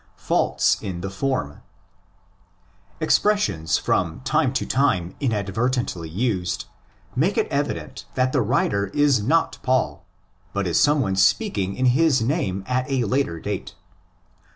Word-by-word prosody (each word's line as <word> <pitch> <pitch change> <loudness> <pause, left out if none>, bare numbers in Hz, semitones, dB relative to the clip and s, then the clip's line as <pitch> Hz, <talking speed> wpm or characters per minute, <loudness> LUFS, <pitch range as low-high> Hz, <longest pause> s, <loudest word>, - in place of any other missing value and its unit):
Faults - - +1
in 90 -3 -5
the 95 +1 -4
Form. 100 - -2 1.4
Expressions 155 - +2
from 85 +1 -1
time 150 -1 +1
to 130 - -1
time 95 -11 +1
inadvertently 110 - -1
used 90 -2 -1 0.5
make - - +1
it - - +3
evident - - -3
that 130 0 +2
the 135 - +3
writer 100 -3 +1
is 145 -6 +3
not 160 +10 +1
Paul, 130 0 0 0.5
but 100 0 -1
is 85 - +2
some 145 0 +4
one 95 -5 0
speaking 95 - +2
in 130 - 0
his 135 +2 +4
name 115 - -1
at 130 +2 -1
a 135 -3 +1
later 110 -7 0
date. 100 +2 -5
120 Hz, 130 wpm, -23 LUFS, 95-135 Hz, 1.4 s, some